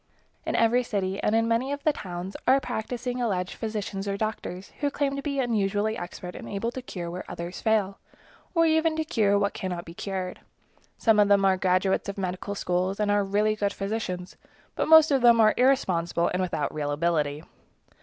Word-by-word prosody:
In - - 0
every 230 +2 +3
city, 195 -4 -2
and 210 - +1
in 225 0 +2
many 230 +4 0
of 285 0 -4
the 305 - +3
towns, 185 -4 -6
are 265 +2 +6
practicing 250 0 -4
alleged 185 -6 -1
physicians 210 -3 -4
or 200 0 -1
doctors, 200 -3 -4
who 290 - +1
claim 280 -1 -1
to 275 - -3
be 280 -1 -2
unusually 215 -3 0
expert 180 -1 -7
and - - -8
able 205 +4 -2
to 260 - -6
cure 175 -8 -6
where 180 +1 -5
others 170 +2 -6
fail, 210 -3 +1 0.6
or 330 0 +5
even 320 0 +2
to 315 - 0
cure 210 -10 +2
what 200 0 0
cannot 180 -4 -4
be 165 - -10
cured. 185 0 -4 0.6
Some 220 -2 +3
of 205 - +5
them 200 -1 +4
are 190 -1 +4
graduates 185 +1 +1
of 200 - -5
medical 185 +1 -3
schools, 185 +1 -1
and 210 -1 +1
are 205 0 +3
really 210 +2 +1
good 205 -1 -1
physicians, 195 -3 -4 0.4
but - - -1
most 320 -1 +8
of 270 -2 +3
them 235 -1 +6
are 215 -1 +6
irresponsible 185 -11 +2
and 180 - -1
without 185 - -2
real 150 -1 -2
ability. 150 -1 0
205 Hz, 195 wpm, -26 LUFS, 185-235 Hz, 0.6 s, most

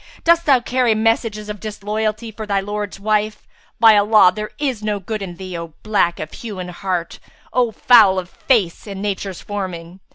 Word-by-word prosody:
Dost 335 0 +3
thou 270 -3 +6
carry 245 -2 +1
messages 220 -1 0
of 210 -1 -6
disloyalty 215 +2 -3
for 215 0 -8
thy 200 -1 +1
lord's 205 0 -5
wife? 215 +1 -1 0.3
By 225 -2 +7
Allah, 205 -2 +6
there 215 0 -4
is 270 -7 -2
no 210 -1 -2
good 215 +3 -5
in 180 -3 -6
thee, 185 0 -7
O 165 -2 -7
black 205 -5 +1
of 155 - -6
hue 215 -4 -7
and 180 -1 -6
heart, 175 -2 -3 0.3
O 245 -2 +2
foul 215 -4 +5
of 180 -1 -3
face 205 -3 0
and 195 -1 -6
Nature's 195 -2 -4
forming!" 185 -3 -6
210 Hz, 185 wpm, -19 LUFS, 190-220 Hz, 0.3 s, By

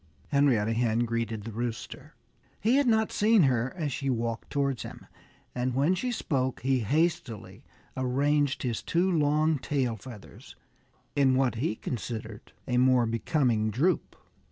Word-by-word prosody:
Henrietta 130 -7 +2
Hen 115 0 +1
greeted 115 -2 -3
the 115 - -6
Rooster. 115 +1 -6 0.4
He 235 +6 +3
had 285 -2 +3
not 220 -2 +2
seen 215 -2 +4
her 125 -2 +1
as 155 -5 -2
she 135 +1 -2
walked 115 -2 -2
towards 140 -3 -1
him. - - -9 0.5
And 125 0 -2
when 145 +7 +3
she 245 +7 -2
spoke 130 - -1
he 130 0 +1
hastily 135 - -1 0.3
arranged 140 +2 +1
his 120 -4 -2
two 180 +3 +1
long 155 -1 +2
tail 130 -3 -1
feathers 105 - -12 0.6
in 135 -2 +4
what 130 -1 +2
he 115 0 -1
considered 110 -2 -6 0.2
a 125 -2 0
more 125 -1 +4
becoming 115 -1 +1
droop. 150 - 0
130 Hz, 145 wpm, -28 LUFS, 115-150 Hz, 0.6 s, seen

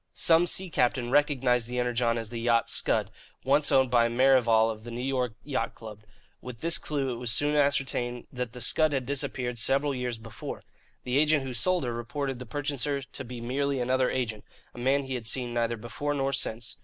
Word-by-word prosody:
Some 165 +1 +5
sea 185 0 +1
captain 125 -2 +1
recognized 130 -5 +2
the 125 +1 -4
Energon 120 -1 +1
as 115 -2 -4
the 115 - -5
yacht 115 -1 +2
Scud, - - +1 0.3
once 145 +2 +3
owned 130 -2 +4
by 120 -1 +4
Merrivale 120 -3 +4
of 110 -1 -9
the 120 - -8
New 120 +1 -5
York 125 -4 -1
Yacht 130 -6 -3
Club. 110 -2 -10 0.4
With 125 -2 -9
this 170 0 +1
clue 140 -3 -2
it - - -6
was 120 0 -4
soon 145 +5 +2
ascertained 135 -4 0
that 125 -3 -4
the 125 - -9
Scud 155 +5 +3
had 135 -2 -1
disappeared 125 -3 -2
several 140 +5 +2
years 125 -2 -3
before. 110 0 -8 0.4
The 125 +3 +1
agent 155 -1 +3
who 130 -1 -5
sold 175 +9 +2
her 120 -2 -2
reported 130 +3 -4
the 125 - -8
purchaser 140 +2 -1
to 130 - -7
be 125 -1 -8
merely 135 +3 -1
another 125 +1 +1
agent, 115 -5 -3 0.3
a - - -10
man 135 +3 +2
he 135 -1 -5
had 120 -3 -4
seen 120 0 -2
neither 120 0 0
before 120 +6 -4
nor 135 0 -1
since. 115 -3 -2
125 Hz, 205 wpm, -28 LUFS, 120-140 Hz, 0.4 s, Some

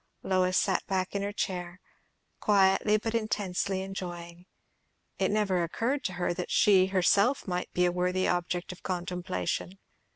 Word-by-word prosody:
Lois 185 -1 +2
sat 190 - +1
back 185 -1 -1
in 200 - -1
her 200 +1 -2
chair, 180 -3 -4 0.6
quietly 200 +1 +3
but 225 +1 -3
intensely 200 -4 -1
enjoying. 175 -2 -7 0.7
It 190 - +2
never 200 -4 +1
occurred 235 - -1
to 185 - -1
her 175 -1 -1
that 180 0 -5
she 190 -3 +5
herself 200 +7 +2
might 180 -1 -3
be 180 - +2
a 175 - +2
worthy 180 +1 0
object 175 0 -1
of 180 - -11
contemplation. 180 - -3
185 Hz, 150 wpm, -29 LUFS, 180-200 Hz, 0.7 s, she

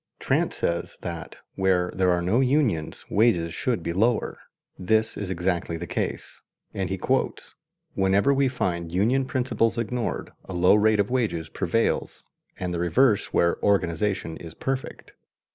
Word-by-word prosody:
Trant - - +1
says 85 0 -2
that 85 -2 -6 0.2
"where 95 -2 +1
there 95 -1 +2
are 90 -1 +2
no 100 +8 +2
unions 130 - +1
wages 95 -7 +2
should 115 -2 -1
be 85 - -2
lower. 110 +5 +1 0.4
This 110 +4 +1
is 100 -3 -4
exactly 90 -2 -1
the 85 - -5
case"; - - -4 0.3
and - - -2
he - - -2
quotes: - - -1 0.4
"Wherever 100 +8 +3
we 135 0 +3
find 85 -10 -2
union 115 +9 +2
principles 125 -3 0
ignored, 115 +1 -2
a 95 - -7
low 90 +1 +5
rate 105 0 +4
of 100 +3 +1
wages 105 -11 -1
prevails 95 +7 -1 0.4
and 90 -1 -3
the 85 - -2
reverse 105 +6 +2
where 85 - +2
organization 95 -3 0
is 85 -1 -10
perfect." 135 0 -4
95 Hz, 150 wpm, -25 LUFS, 85-115 Hz, 0.4 s, low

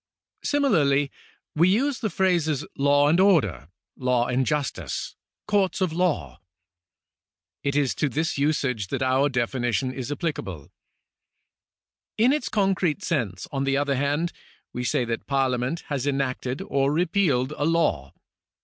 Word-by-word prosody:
Simi 285 -1 +1
larly 145 - +2 0.4
we 170 +4 +4
use 255 +7 +1
the 220 - -1
phrases 170 -7 +1
law 145 +1 +3
and 165 +4 +3
order, 105 - +3 0.3
law 125 -2 +1
and 125 +1 0
justice, 135 - -2 0.3
courts 205 -3 +1
of 185 -4 0
law. 140 - -1 1.2
It 140 0 -1
is 145 -3 +2
to 150 - +2
this 155 +5 -1
usage 135 -7 0
that 130 - -2
our 130 +2 +2
definition 125 0 -1
is 130 0 -5
apphcable. 145 - -4 1.5
In 240 +5 +4
its 300 -4 -1
concrete 195 -3 +1
sense, 115 - -2
on 135 -1 -1
the 135 0 +1
other 145 0 +1
hand, 145 +5 0 0.4
we 125 - -3
say 125 0 +1
that 115 0 -4
Parlia 135 -3 +1
ment 130 +7 -2
has 140 -2 -3
enacted 135 -2 -2
or 140 0 +1
repealed 160 -5 +1
a 145 - -1
law. 150 - +1
140 Hz, 140 wpm, -25 LUFS, 125-170 Hz, 1.5 s, we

